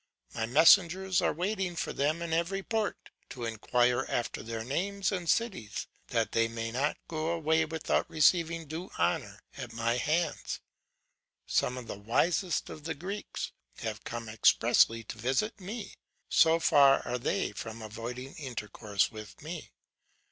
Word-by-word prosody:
My 110 0 -2
messengers 175 +6 +5
are - - +2
waiting 185 +1 -2
for - - -2
them 155 +4 0
in 165 -1 -3
every 180 +4 0
port, 220 -2 -2 0.2
to 120 -3 -5
inquire 120 +2 +2
after 120 - -2
their 115 0 -4
names 195 - -1
and 180 -4 -3
cities, 185 - 0 0.2
that - - 0
they 115 0 +3
may 115 0 -4
not 135 +5 0
go 155 -1 -2
away 160 -1 +2
without 160 0 -1
receiving 165 +1 +3
due 160 +5 -6
honour 85 +1 0 0.2
at - - -6
my 115 +1 0
hands. 160 +7 -1 0.9
Some 125 -1 0
the 100 - -7
wisest 160 - +1
of 155 - -9
the 160 -1 -2
Greeks 195 +7 -5 0.3
have 110 -1 -4
come 115 -1 -5
expressly 115 +1 +4
to 110 - -8
visit 135 - 0
me, 210 +4 -6 0.3
so 165 +1 +5
far 140 -4 +5
are 125 - -1
they - - 0
from 110 +2 -7
avoiding 120 +5 -6
intercourse 105 - -2
with 105 -2 -10
me. 160 +1 -7
150 Hz, 150 wpm, -30 LUFS, 115-170 Hz, 0.9 s, messengers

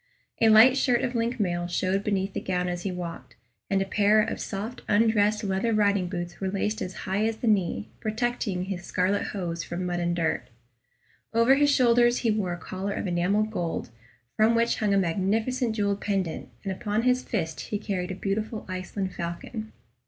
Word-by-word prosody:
A 225 - +6
light 230 +5 +8
shirt 250 -3 +2
of 250 - -1
link 235 +1 -1
mail 175 -3 0
showed 185 +2 0
beneath 195 -2 -1
the - - -3
gown 180 -1 -1
as 175 0 -3
he 195 - -2
walked, 175 -2 -7 0.3
and 195 -1 +2
a - - -7
pair 205 +2 +3
of 215 - 0
soft 220 +5 -5
undressed 210 0 +3
leather 200 +3 0
riding 200 -3 +2
boots 175 -1 -5
were 190 - 0
laced 210 +3 -1
as 185 - -4
high 195 +3 0
as 225 -1 -2
the - - -5
knee, 180 - +1
protecting 220 -4 -1
his 185 -1 -5
scarlet 185 +3 0
hose 170 -4 -3
from 175 +1 -4
mud 175 -1 -1
and 175 0 0
dirt. 165 -7 0 0.9
Over 230 +3 +6
his 290 +1 +4
shoulders 240 -3 +4
he 225 - +4
wore 200 -5 -1
a - - -5
collar 190 +3 -4
of - - -3
enamelled 195 +4 +1
gold, 170 - -3 0.4
from 220 +2 +4
which 235 0 +2
hung 205 -2 +1
a - - +4
magnificent 220 +7 0
jewelled 200 -1 0
pendant, 195 -5 -2
and 195 - -2
upon 210 +3 -1
his 250 0 +3
fist 165 -11 -3
he 210 - -1
carried 195 -3 -3
a 185 - -3
beautiful 215 +3 -3
Iceland 185 +1 -4
falcon. 175 +6 -5
200 Hz, 190 wpm, -27 LUFS, 180-220 Hz, 0.9 s, light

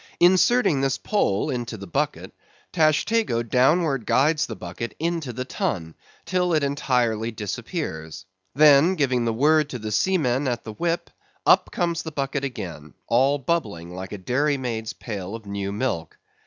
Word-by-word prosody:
Inserting 180 - +4
this 135 -1 +1
pole 150 - 0
into 120 -3 -4
the 100 - -8
bucket, 85 - -2 0.4
Tashtego 155 - +2
downward 135 +1 +2
guides 150 +3 +3
the 110 - -6
bucket 90 +7 -6
into 165 -4 -2
the 125 +2 -5
Tun, 105 - -3 0.3
till 180 0 +1
it 155 - +1
entirely 125 -5 0
disappears; 105 - -5 0.3
then 150 +4 +6
giving 130 -6 +1
the 115 - +1
word 150 +5 +3
to 125 - -4
the 110 -2 -5
seamen 140 - +1
at 120 -2 -2
the 110 - -7
whip, 170 +7 -2 0.3
up - - +5
comes 170 -3 -1
the 160 - -6
bucket 140 -1 -2
again, 90 - -6
all 135 +5 +3
bubbling 105 - -2
like 95 +1 -7
a 105 - -5
dairy 140 +9 0
maid's 115 -4 -4
pail 100 -2 -6
of 115 -2 -10
new 100 -1 -4
milk. 100 -7 -3
130 Hz, 155 wpm, -24 LUFS, 110-155 Hz, 0.4 s, then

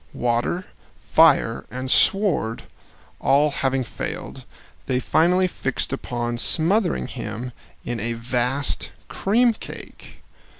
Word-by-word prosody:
Water, 120 +10 -1 0.5
fire, 150 -8 +4
and 130 +1 -3
sword 195 - +3 0.6
all 145 +2 +3
having 135 -1 0
failed, 115 - -6 0.4
they 125 -1 +1
finally 180 +7 +2
fixed 135 -5 -2
upon 120 -3 -3
smothering 170 - +3
him 110 - -6 0.3
in 120 -1 -3
a 115 +2 -2
vast 125 - -1 0.2
cream 235 +4 +2
cake. - - -11
130 Hz, 100 wpm, -22 LUFS, 120-165 Hz, 0.6 s, fire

